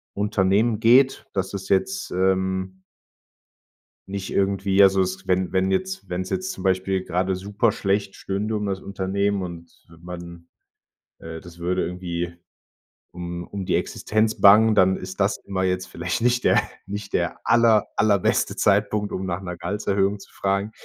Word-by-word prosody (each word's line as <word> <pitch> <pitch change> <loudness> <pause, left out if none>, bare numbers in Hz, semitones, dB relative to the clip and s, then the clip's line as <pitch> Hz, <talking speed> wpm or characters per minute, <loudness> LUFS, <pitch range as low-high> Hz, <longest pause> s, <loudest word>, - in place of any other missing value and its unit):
Unternehmen 105 +2 +1
geht, 125 +4 +4
dass 95 0 -2
es 95 -1 -6
jetzt, 195 - 0
ähm 95 0 0 1.3
nicht 95 0 -5
irgendwie 100 0 +3
also, 95 0 +5
s 95 +1 -3
wenn 95 0 +1
wenn 95 0 +2
jetzt 190 - -2
wenn's 90 +1 -3
jetzt 185 +1 -2
zum - - -8
Beispiel 95 0 0
gerade 90 +2 0
super 105 +4 0
schlecht 100 -1 -1
stünde 105 +3 -2
um 105 - -3
das 95 -1 -3
Unternehmen 100 +1 -1
und 85 -1 -10 0.2
man 85 -1 -9 0.7
äh, 80 0 -8
das 85 +1 -14
würde 90 +2 0
irgendwie 85 -1 -4 0.8
um 85 0 -6
um 100 -2 -5
die 90 - -1
Existenz 110 +1 0
bangen, 110 +2 +7
dann 95 -2 +4
ist 95 +1 -8
das 100 +1 +2
immer 95 -1 -2
jetzt 90 0 -1
vielleicht 90 +5 -3
nicht 125 +1 +2
der - - +4 0.2
nicht 100 0 -6
der 85 -1 -1
aller 115 -2 +4
allerbeste 100 -3 +2
Zeitpunkt, 105 +1 +1
um 95 - -3
nach 90 0 -3
'ner 90 -2 -6
Gehaltserhöhung 100 0 -1
zu - - -15
fragen. 100 +2 -1
95 Hz, 155 wpm, -23 LUFS, 95-105 Hz, 1.3 s, bangen